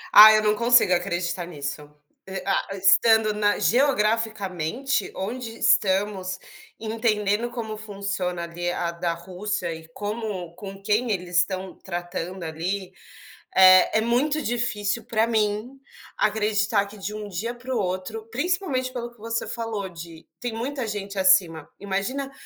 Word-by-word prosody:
Ah, 215 +1 +12
eu 215 0 +4
não 210 0 +3
consigo 235 -5 +5
acreditar 175 -1 -1
nisso. 145 -2 -6 0.4
E 190 0 -5
a 195 0 -1
estando 215 +3 +5
na 205 0 +1
geograficamente, 220 - +1
onde 225 +4 -5
estamos, 190 -3 +1 0.4
entendendo 220 0 0
como 230 -3 -5
funciona, 195 -4 -3
ali, 175 +1 -3
a 175 -1 -2
da 170 0 -2
Rússia 180 +2 -4
e 160 0 -10
como 205 -2 -5
com 195 +1 -9
quem 215 +4 +1
eles 180 -2 -2
estão 185 +1 0
tratando, 175 0 -5
ali, 180 +4 -4 0.6
eh, 185 +1 +7
é - - 0
muito 270 +7 +1
difícil 230 -3 -1
para 225 0 +1
mim 220 +3 -1 0.4
acreditar 215 -1 +1
que, 210 - -12
de 205 +1 -5
um 210 -1 -6
dia 220 +6 -3
para 250 +2 -5
o - - +1
outro 190 +3 -3
principalmente 280 -3 -1
pelo 240 -1 -5
que 240 - -25
você 230 +1 -3
falou 225 -4 -4
de 165 -1 -11
tem 245 -2 -4
muita 250 +1 -3
gente 200 -1 -4
acima, 185 -5 +3
imagina 205 +8 -3
205 Hz, 140 wpm, -24 LUFS, 185-230 Hz, 0.6 s, Ah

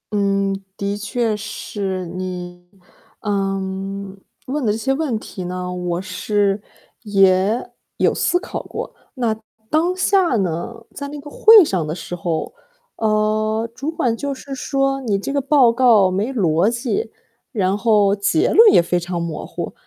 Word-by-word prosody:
嗯， 195 -1 +1 0.2
的 200 0 -2
确 220 +1 -1
是。 195 -3 -4
你， 180 0 -6 0.6
嗯， 195 -1 -3 0.3
问 280 +2 -2
的 215 - +2
这 210 - -1
些 265 +4 0
问 270 -6 -1
题 190 -3 -8
呢， 180 0 -4
我 180 -1 -2
是 205 0 0 0.4
也 195 +1 +2 0.3
有 - - +3
思 355 - +1
考 - - -5
过。 - - -7 0.2
那 235 -4 0 0.4
当 340 +4 +2
下 375 -6 +2
呢 195 +4 -2
在 285 - -6
那 290 +1 -7
个 290 0 -11
会 435 -4 +8
上 180 - -1
的 155 - -3
时 180 - -6
候， 165 -2 -3 0.4
呃， 215 +1 +1
主 275 +5 -4
管 245 -8 0
就 280 +3 -3
是 275 +1 -9
说： 270 0 0
“你 215 -6 0
这 240 +8 -4
个 280 - +1
报 275 -3 +5
告 230 -6 +5
没 205 +8 -1
逻 180 -4 +2
辑， 245 - -2 0.4
然 195 -6 +1
后 205 -2 +3
结 200 -5 +2
论 445 0 +8
也 170 - +6
非 175 +1 0
常 175 0 -4
模 170 -2 -4
糊。” - - -5
210 Hz, 165 characters per minute, -20 LUFS, 190-255 Hz, 0.6 s, 会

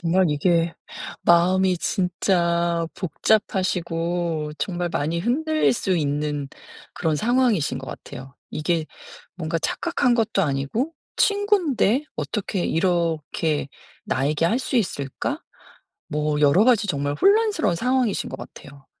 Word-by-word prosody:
정말 180 +2 +2
이게 165 +2 +1 0.5
마음이 180 +1 +4
진짜 170 -3 0
복잡하시고 175 -4 -1
정말 175 +3 -2
많이 160 +4 -1
흔들릴 310 - +1
수 200 -5 -1
있는 145 -1 -1 0.4
그런 160 -1 -1
상황이신 225 - +1
것 135 - -8
같아요. 135 +2 -9 0.2
이게 160 0 -1 0.5
뭔가 165 -1 -2
착각한 280 - 0
것도 225 -4 +1
아니고 145 - -1 0.3
'친구인데 360 - +2
어떻게 195 -3 -2
이렇게 165 -4 0 0.4
나에게 145 +4 0
할 230 - +1
수 260 - -2
있을까?' 145 - -2 0.7
뭐 150 0 -1
여러 150 +8 +5
가지 230 -4 +4
정말 145 -5 -1
혼란스러운 410 - +3
상황이신 250 +2 0
것 - - -5
같아요. 140 -1 -12
175 Hz, 265 characters per minute, -23 LUFS, 150-220 Hz, 0.7 s, 여러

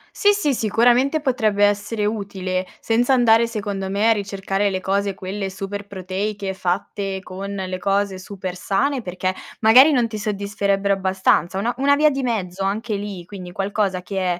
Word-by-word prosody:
Sì, 410 - +4
sì, 350 -9 +1
sicuramente 245 +6 +3
potrebbe 220 -7 +2
essere 205 +1 0
utile 190 -3 -2
senza 240 +3 +2
andare, 235 -2 +5
secondo 200 -4 -4
me, 205 +3 +2
a - - +6
ricercare 200 -1 -1
le 190 -1 -3
cose 200 +1 0
quelle 195 +1 -4
super 195 +1 -6
proteiche 195 +1 -4
fatte 190 +1 -2
con 195 +2 -7
le 185 -2 -4
cose 195 0 0
super 185 -1 -6
sane, 250 +9 0
perché 185 -1 -2 0.3
magari 250 +7 +7
non 245 -5 +2
ti 220 -1 -6
soddisferebbero 200 -1 0
abbastanza. 190 -1 +1
Una 230 +4 0
una 280 +2 +4
via 305 +1 +5
di 275 -2 -2
mezzo 195 -6 -2
anche 210 +3 -1
lì, 200 -3 -5
quindi 180 -1 -9
qualcosa 195 0 -1
che 185 -2 -2
200 Hz, 165 wpm, -21 LUFS, 190-225 Hz, 0.3 s, magari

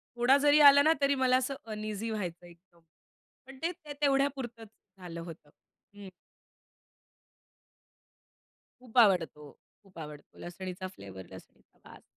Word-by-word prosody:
थोडा 245 +3 +4
जरी 290 +1 +4
आला 280 0 +6
ना 315 +3 +4
तरी 280 0 +3
मला 255 -1 +3
असं 260 +2 -2 0.2
अनइझी 215 +1 -5
व्हायचं 180 -5 -5
एकदम 170 0 -21 0.7
पण 270 - -12
ते, 335 +2 -1
ते 310 -4 -11
तेवढ्यापुरतच 270 -5 0 0.3
झालं 170 -2 -8
होतं. 165 -3 -11 0.5
हं. 200 -2 -10 2.7
खूप 250 -1 -5
आवडतो, 165 - +3 0.3
खूप 185 -3 -18
आवडतो 150 -2 -11
लसणीचा 185 +1 -7
फ्लेवर, 95 - -11
लसणीचा 95 -1 -16
वास. - - -15
215 Hz, 125 wpm, -30 LUFS, 170-270 Hz, 2.7 s, आला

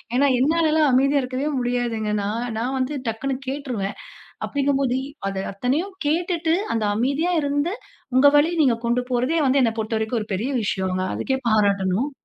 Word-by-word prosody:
ஏன்னா, 280 +3 +4
என்னாலலாம் 310 +1 +3
அமைதியா 275 +2 +3
இருக்கவே 255 +3 -2
முடியாதுங்க. 240 -3 -1
நான், 225 +4 -2
நான் 250 +4 -1
வந்து 260 +3 -1
டக்குனு 245 +5 -2
கேட்டுருவேன். 255 -8 -3 0.5
அப்பிடீங்கும்போது 275 -2 0 0.3
அத 195 - -5 0.2
அத்தனையும் 275 - -1
கேட்டுட்டு, 330 +1 +1 0.2
அத 225 - 0
அமைதியா 280 +9 +1
இருந்து, 290 +5 0 0.4
உங்க 275 +2 +7
வழி 305 +3 +3
நீங்க 250 -5 +3
கொண்டு 240 +1 +2
போறதே 255 +7 +1
வந்து, 270 +1 +3
என்ன 230 - +2
பொறுத்த 220 +1 -1
வரைக்கும் 220 +2 -1
ஒரு 215 - -10
பெரிய 225 +8 -2
விஷயங்க. 190 -2 -1
அதுக்கே 265 -1 -1
பாராட்டணும். 200 +3 +2
255 Hz, 150 wpm, -23 LUFS, 225-285 Hz, 0.5 s, உங்க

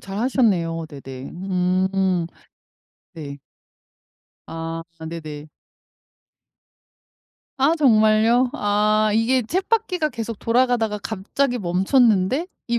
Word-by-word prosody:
잘하셨네요. 195 -7 0
네네. 135 -2 -9
음. 185 0 0 0.9
네. 145 -3 -8 1.1
아 165 0 -5 0.3
네네. 155 -2 -8 2.1
아 280 +5 +3
정말요? 230 -3 +4
아 215 -3 +1
이게 235 +4 +2
쳇바퀴가 365 - -1
계속 230 -2 -5
돌아가다가 230 -3 +1
갑자기 245 +5 -2
멈췄는데, 205 - +2 0.2
이 235 0 0
215 Hz, 180 characters per minute, -22 LUFS, 180-245 Hz, 2.1 s, 정말요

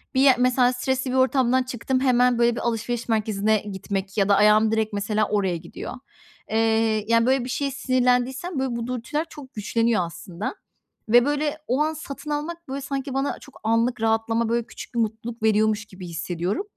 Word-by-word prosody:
bir 260 - +4
ye 270 -2 +7
mesela 250 0 +3
stresli 260 +1 -1
bir - - -1
ortamdan 260 -1 +3
çıktım 255 +1 -2
hemen, 250 -2 +3
böyle, 235 0 +3
bir - - -4
alışveriş 235 +1 -2
merkezine 215 -1 +1
gitmek 195 0 -5
ya 195 0 +2
da 200 - +6
ayağım 215 +1 +5
direkt, 220 -1 0
mesela, 210 +1 0
oraya 190 -4 0
gidiyor. 170 +1 -8 0.6
Eee, 220 -1 +2
yani, 230 0 +4
böyle, 260 -1 +2
bir 255 - -6
şeye 275 +2 -1
sinirlendiysem, 255 +4 0
böyle, 265 -2 -1
bu 235 0 -3
dürtüler 255 +6 -2
çok 280 -5 -12
güçleniyor 225 -2 +1
aslında 175 - -6 0.5
ve, 240 +2 +6
böyle, 295 +1 0
o 260 +4 +1
an 310 +1 +1
satın 295 -1 -8
almak, 330 +3 -4
böyle, 275 +1 -4
sanki 270 0 -4
bana 270 +1 -1
çok 280 - -15
anlık 230 +2 +1
rahatlama, 225 +1 +1
böyle, 235 0 0
küçük - - -10
bir 235 - +1
mutluluk 225 +1 -3
veriyormuş 215 -1 +2
gibi 185 -2 -10
hissediyorum. 175 - -3
235 Hz, 180 wpm, -24 LUFS, 215-260 Hz, 0.6 s, ye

